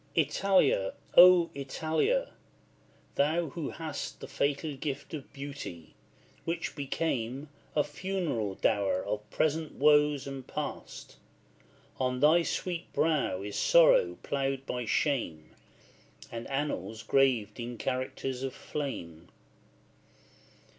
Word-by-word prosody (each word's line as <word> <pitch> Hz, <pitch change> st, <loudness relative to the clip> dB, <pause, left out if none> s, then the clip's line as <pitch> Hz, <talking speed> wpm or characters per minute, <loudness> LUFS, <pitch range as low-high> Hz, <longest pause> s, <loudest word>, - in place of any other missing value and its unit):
Italia! 155 Hz, -, +2 dB, 0.2 s
O 175 Hz, -1 st, +8 dB
Italia! 160 Hz, -, 0 dB, 0.8 s
thou 160 Hz, +3 st, +1 dB
who 155 Hz, 0 st, -4 dB
hast 155 Hz, -3 st, -5 dB
The -, -, -8 dB
fatal 145 Hz, +2 st, -1 dB
gift 140 Hz, +1 st, -5 dB
of 145 Hz, -4 st, -7 dB
beauty, 140 Hz, -, -8 dB, 0.5 s
which 170 Hz, 0 st, -3 dB
became 140 Hz, -2 st, -2 dB, 0.3 s
A 150 Hz, -, +4 dB
funeral 150 Hz, -, -2 dB
dower 100 Hz, -3 st, +1 dB
of 105 Hz, +1 st, -4 dB
present 155 Hz, 0 st, 0 dB
woes 150 Hz, -1 st, +4 dB
and 135 Hz, -2 st, -7 dB
past, -, -, -6 dB, 0.8 s
On 125 Hz, -1 st, 0 dB
thy 155 Hz, +5 st, +6 dB
sweet 175 Hz, 0 st, -3 dB
brow 150 Hz, -, +1 dB
is 105 Hz, 0 st, -5 dB
sorrow -, -, +5 dB
ploughed 135 Hz, -1 st, -1 dB
by 125 Hz, -2 st, -3 dB
shame, 105 Hz, -, -1 dB, 0.8 s
And 115 Hz, 0 st, -6 dB
annals 135 Hz, -5 st, -3 dB
graved 120 Hz, -4 st, +2 dB
in 120 Hz, 0 st, -5 dB
characters 130 Hz, +1 st, -3 dB
of 135 Hz, -1 st, -4 dB
flame. 85 Hz, -, -6 dB
140 Hz, 105 wpm, -30 LUFS, 125-160 Hz, 0.8 s, O